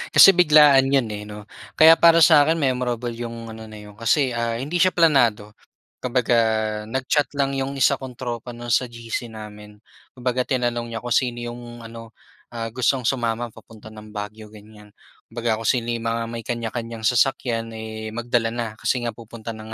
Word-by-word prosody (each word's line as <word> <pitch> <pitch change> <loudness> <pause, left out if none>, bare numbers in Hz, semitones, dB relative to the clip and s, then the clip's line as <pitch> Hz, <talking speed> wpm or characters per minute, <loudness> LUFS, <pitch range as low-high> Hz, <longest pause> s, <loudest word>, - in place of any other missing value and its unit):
Kasi 195 -2 +9
biglaan 150 -5 +6
yun, 135 -5 +2
eh, 105 -1 -6
'no, 105 0 -10 0.3
kaya 160 +1 +9
para 170 0 +5
sa 155 -2 +7
akin 160 +2 +1
memorable 125 -3 -1
yung 115 -1 -7
ano 110 0 -9
na 110 -1 -11
yun, 105 0 -13
kasi, 120 +3 +1
ah, 115 0 -2
hindi 150 +7 -5
siya 185 +1 +4
planado, 120 - +2 0.5
kumbaga 125 -1 +1 0.5
nag-chat 130 +5 -1
lang 140 -1 -1
yung 135 +1 -3
isa - - +4
kong 130 -3 -10
tropa, 120 -1 -5
'no, 120 0 -9
sa 120 - +2
GC 115 0 -6
namin. 105 -1 -11 0.3
Kumbaga, 125 0 -2
tinanong 120 -2 -2
niya 115 - -4
kung 120 0 -2
sino 120 -2 0
yung 120 0 -9
ano, 115 0 -11 0.4
ah, 115 -1 -4
gustong 125 0 +1
sumama 120 -2 -1
papunta 110 -1 -15
ng 110 -1 -12
Baguio, 105 +1 -8
gan'yan. 105 0 -16 0.4
Kumbaga, 115 -2 -1
kung 115 - -7
sino 120 -2 +1
yung 115 -1 -3
mga 115 0 -1
may 115 0 -6
kanya-kanyang 115 -1 -5
sasakyan, 115 -1 0
eh, 110 0 -7
magdala 120 -1 -1
na 115 -2 -5
kasi 125 - -1
nga 120 - -2
pupunta 115 0 -10
ng 110 0 -8
120 Hz, 180 wpm, -22 LUFS, 110-130 Hz, 0.5 s, Kasi